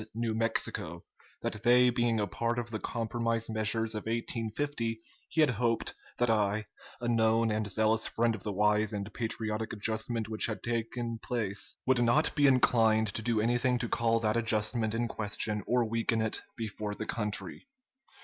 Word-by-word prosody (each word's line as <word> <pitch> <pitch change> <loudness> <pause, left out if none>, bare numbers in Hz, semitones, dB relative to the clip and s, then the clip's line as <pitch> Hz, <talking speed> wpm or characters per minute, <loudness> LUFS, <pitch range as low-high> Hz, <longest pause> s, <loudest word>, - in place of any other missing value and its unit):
New 115 -1 -1
Mexico; 110 -7 -2 0.4
that 105 - -3
they 125 +1 +5
being 120 -1 +1
a 105 - +1
part 115 +3 -2
of 120 -1 -3
the 110 - -3
compromise 115 0 -1
measures 110 +1 0
of 105 0 -5
1850 115 +1 -2 0.3
he 160 - +2
had 150 -4 +5
hoped 115 0 0 0.2
that 120 - +2
I, 110 -1 +1 0.3
a 120 - -3
known 115 -1 +3
and 105 -1 -1
zealous 110 +3 +2
friend 115 0 +1
of 110 - -7
the 105 - -3
wise 105 +1 +2
and 100 0 -5
patriotic 110 -1 -2
adjustment 110 +1 -2
which 110 0 +2
had 110 - -4
then 120 - -1
taken 115 0 -3
place, 105 -5 -1
would 130 -2 +3
not 120 +6 +3
be 145 -2 +4
inclined 115 -4 +4
to - - -2
do 115 0 0
anything 120 +3 +2
to 120 - -2
call 115 0 +1
that 110 0 +1
adjustment 110 0 +1
in 120 +1 0
question 105 -1 -2
or 125 -1 +2
weaken 115 0 0
it 110 -1 -1 0.2
before 105 -2 -4
the 110 - -5
country. 105 - -3
115 Hz, 175 wpm, -30 LUFS, 110-120 Hz, 0.4 s, they